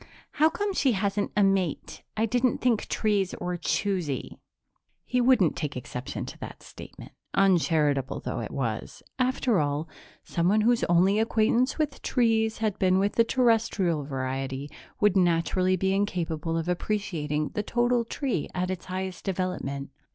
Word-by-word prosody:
"How 310 Hz, +1 st, +4 dB
come 405 Hz, +3 st, -2 dB
she 270 Hz, -8 st, +2 dB
hasn't 200 Hz, 0 st, -1 dB
a 205 Hz, -, +5 dB
mate? 195 Hz, -5 st, 0 dB, 0.2 s
I 220 Hz, -, +3 dB
didn't 245 Hz, +2 st, +1 dB
think 240 Hz, -4 st, +1 dB
trees 205 Hz, -4 st, 0 dB
were 180 Hz, 0 st, -2 dB
choosy." 175 Hz, -4 st, -2 dB, 0.7 s
He 250 Hz, 0 st, +1 dB
wouldn't 240 Hz, -, +4 dB
take 145 Hz, -4 st, -4 dB
exception 125 Hz, 0 st, -5 dB
to -, -, -10 dB
that -, -, -9 dB
statement, -, -, -11 dB, 0.2 s
uncharitable 160 Hz, -8 st, +2 dB
though -, -, -4 dB
it -, -, -4 dB
was; 115 Hz, -6 st, -4 dB, 0.2 s
after 255 Hz, -4 st, +2 dB
all, 145 Hz, +2 st, -1 dB, 0.4 s
someone 185 Hz, +6 st, +1 dB
whose 235 Hz, +2 st, +3 dB
only 185 Hz, +4 st, +3 dB
acquaintance 225 Hz, +3 st, +2 dB
with 300 Hz, -3 st, -2 dB
trees 225 Hz, -3 st, +1 dB
had 215 Hz, -2 st, -1 dB
been 185 Hz, -1 st, +3 dB
with 200 Hz, +2 st, +1 dB
the 230 Hz, -, +4 dB
Terrestrial 225 Hz, -, +2 dB
variety 135 Hz, 0 st, -4 dB, 0.3 s
would 210 Hz, -2 st, +3 dB
naturally 180 Hz, +1 st, +2 dB
be 190 Hz, +1 st, 0 dB
incapable 165 Hz, -5 st, -1 dB
of 165 Hz, 0 st, -2 dB
appreciating 170 Hz, -6 st, -1 dB
the 210 Hz, -, -2 dB
total 240 Hz, +2 st, +1 dB
tree 235 Hz, -, -2 dB
at 180 Hz, +1 st, -1 dB
its 185 Hz, -2 st, -5 dB
highest 185 Hz, -1 st, -5 dB
development. 175 Hz, -8 st, -3 dB
190 Hz, 150 wpm, -27 LUFS, 165-225 Hz, 0.7 s, a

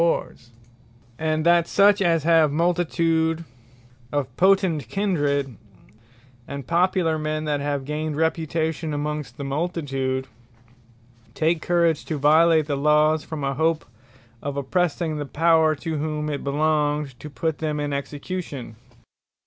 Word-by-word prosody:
And 170 Hz, -, +5 dB
Friends 120 Hz, -, -19 dB, 0.7 s
And 155 Hz, 0 st, 0 dB
that 170 Hz, -1 st, +4 dB
such 200 Hz, 0 st, +4 dB
as 165 Hz, -4 st, +2 dB
have 160 Hz, -2 st, +4 dB
multitude 165 Hz, 0 st, +1 dB, 0.7 s
of 135 Hz, -4 st, -2 dB
Potent 185 Hz, -, +2 dB
Kindred; 145 Hz, -, -1 dB, 0.9 s
and 140 Hz, -2 st, -6 dB
popular 170 Hz, 0 st, +1 dB
men, 155 Hz, 0 st, -2 dB
that 150 Hz, -1 st, 0 dB
have 140 Hz, -1 st, -2 dB
gained 150 Hz, +1 st, -3 dB
reputation 160 Hz, -1 st, -1 dB
amongst 150 Hz, 0 st, -4 dB
the 140 Hz, -, -5 dB
Multitude, 135 Hz, -3 st, -2 dB, 1.1 s
take 160 Hz, 0 st, +1 dB
courage 170 Hz, -3 st, +1 dB
to 155 Hz, -, -3 dB
violate 155 Hz, +2 st, +4 dB
the 145 Hz, -1 st, -2 dB
Lawes, 150 Hz, +2 st, +3 dB
from 155 Hz, -3 st, -6 dB
a 135 Hz, 0 st, 0 dB
hope 160 Hz, +2 st, 0 dB, 0.6 s
of 140 Hz, 0 st, -4 dB
oppressing 160 Hz, +2 st, -1 dB
the 145 Hz, -, -3 dB
Power, 160 Hz, +1 st, +3 dB
to 155 Hz, +1 st, -4 dB
whom 150 Hz, 0 st, -2 dB
it 140 Hz, -, -4 dB
belongeth 150 Hz, -2 st, 0 dB
to 150 Hz, -, -8 dB
put 150 Hz, +3 st, -3 dB
them 150 Hz, -2 st, -2 dB
in 145 Hz, -1 st, -2 dB
execution. 140 Hz, -4 st, -5 dB
155 Hz, 135 wpm, -23 LUFS, 145-165 Hz, 1.1 s, And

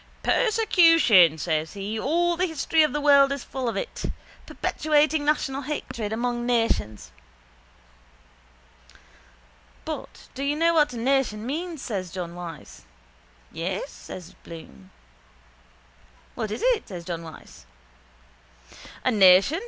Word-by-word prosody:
—Persecution, 330 Hz, -, +4 dB
says 155 Hz, 0 st, -2 dB
he, 205 Hz, +2 st, -4 dB
all 345 Hz, +7 st, +1 dB
the 365 Hz, +2 st, 0 dB
history 320 Hz, 0 st, +1 dB
of 305 Hz, -2 st, +3 dB
the 295 Hz, -, -2 dB
world 280 Hz, -1 st, +5 dB
is 280 Hz, -2 st, -3 dB
full 260 Hz, -3 st, -4 dB
of -, -, -4 dB
it. -, -, -5 dB, 0.4 s
Perpetuating 305 Hz, 0 st, +1 dB
national 285 Hz, -2 st, 0 dB
hatred 255 Hz, -7 st, -5 dB
among 240 Hz, +1 st, -2 dB
nations. 225 Hz, -, -1 dB, 2.7 s
—But -, -, -7 dB
do 275 Hz, -, -5 dB
you 285 Hz, +1 st, 0 dB
know 335 Hz, +2 st, +2 dB
what 300 Hz, -4 st, +3 dB
a -, -, -6 dB
nation 240 Hz, -3 st, 0 dB
means? 320 Hz, +3 st, -4 dB
says 190 Hz, -6 st, -4 dB
John 170 Hz, -1 st, -6 dB
Wyse. 165 Hz, -, -9 dB, 0.7 s
—Yes, 185 Hz, -, -4 dB
says 180 Hz, -2 st, -10 dB
Bloom. 160 Hz, -, -12 dB, 1.4 s
—What 215 Hz, -, -4 dB
is 215 Hz, -, -5 dB
it? -, -, +1 dB
says 175 Hz, -4 st, -8 dB
John 170 Hz, -1 st, -4 dB
Wyse. 160 Hz, -, -13 dB, 1.4 s
—A 255 Hz, -, +3 dB
nation? 195 Hz, -, +5 dB
245 Hz, 120 wpm, -25 LUFS, 185-300 Hz, 2.7 s, world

